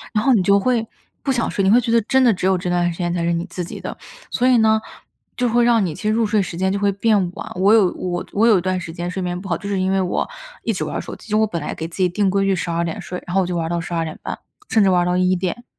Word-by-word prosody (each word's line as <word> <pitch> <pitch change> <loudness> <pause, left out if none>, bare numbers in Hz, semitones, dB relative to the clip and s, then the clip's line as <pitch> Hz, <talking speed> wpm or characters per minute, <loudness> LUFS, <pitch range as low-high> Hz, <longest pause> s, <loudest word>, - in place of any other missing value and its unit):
然 210 - +2
后 270 - +4
你 215 -6 +4
就 200 +2 +4
会 230 +1 +1 0.4
不 275 - 0
想 240 -3 0
睡， 195 - -1
你 190 - +3
会 240 +4 +6
觉 230 -1 -2
得 230 - +5
真 265 +4 +2
的 245 -3 +5
只 185 -1 -2
有 190 -1 +3
这 180 0 -3
段 175 0 +1
时 165 - -10
间 175 -1 -1
才 170 -1 -1
是 170 - +1
你 170 0 -1
自 180 -1 -5
己 - - -8
的。 - - -6 0.3
所 250 +1 +1
以 255 - +5
呢， 220 -1 +4 0.6
就 245 0 +1
会 240 +1 +3
让 230 -4 +4
你 165 - -3
其 - - -10
实 215 - +1
入 225 +1 +2
睡 210 0 +2
时 175 -2 -6
间 190 +1 0
就 200 - -1
会 200 0 +2
变 215 +2 +2 0.2
晚， - - -7
我 195 +3 +4
有 200 -5 +4
我 175 -1 -3
我 220 +3 +3
有 215 -4 +6
一 - - 0
段 185 +1 -1
时 165 -1 -7
间 175 +1 -4
睡 190 +1 -4
眠 175 0 -2
不 195 - -8
好， 170 - 0
就 200 - -7
是 200 -1 -1
因 190 +1 +1
为 195 - +2
我 180 -1 -1 0.4
一 - - 0
直 - - -2
玩 - - -4
儿 - - -1
手 - - -7
机， - - -16
就 210 - +1
是 215 - +4
我 220 - +3
本 170 -5 -4
来 150 - -4
给 160 - -5
自 165 - -11
己 185 -1 +3
定 195 +3 0
规 195 0 +1
矩 195 0 +2
12 170 -1 -1
点 165 - -4
睡， 180 - -7
然 175 - -5
后 195 - +4
我 180 - -2
就 180 - -3
玩 165 - -1
儿 - - -3
到 170 0 -1
12:30， 165 -1 -4 0.3
甚 220 - +3
至 195 - +4
玩 180 -1 +3
儿 - - -1
到 180 - +1
1 185 0 +2
点。 185 +6 -3
190 Hz, 355 characters per minute, -20 LUFS, 175-215 Hz, 0.6 s, 会